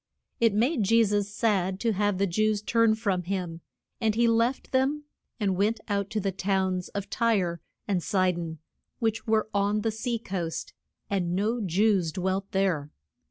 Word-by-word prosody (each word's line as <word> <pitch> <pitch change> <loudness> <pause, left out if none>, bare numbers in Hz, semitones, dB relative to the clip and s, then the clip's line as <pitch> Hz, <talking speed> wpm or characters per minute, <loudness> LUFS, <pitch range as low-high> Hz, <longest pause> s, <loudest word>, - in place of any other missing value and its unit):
It 230 -3 +3
made 245 +5 +2
Je 230 +3 +4
sus 205 -1 0
sad 195 -4 0
to 230 - +2
have 205 -1 +1
the 200 - +2
Jews 215 +3 +1
turn 230 -1 +3
from 200 -5 0
him, 175 -2 -4 0.4
and 220 -2 +1
he 235 +1 +3
left 230 +3 +1
them, 270 +3 +1 0.4
and 200 -3 +1
went 210 +4 +1
out 200 -2 -1
to 215 - -1
the 195 -1 -1
towns 190 -1 -1
of 200 0 -4
Tyre 200 -7 +1 0.3
and 190 -3 +1
Si 185 -1 +2
don, 165 -2 -5 0.4
which 225 -1 -1
were 220 -1 +2
on 205 +1 +1
the 225 - 0
sea 230 +2 -2
coast. 180 -7 -4 0.3
And 180 -3 -1
no 220 +5 0
Jews 190 -2 +2
dwelt 190 +2 -2
there. 180 -7 0
200 Hz, 170 wpm, -27 LUFS, 185-225 Hz, 0.4 s, Je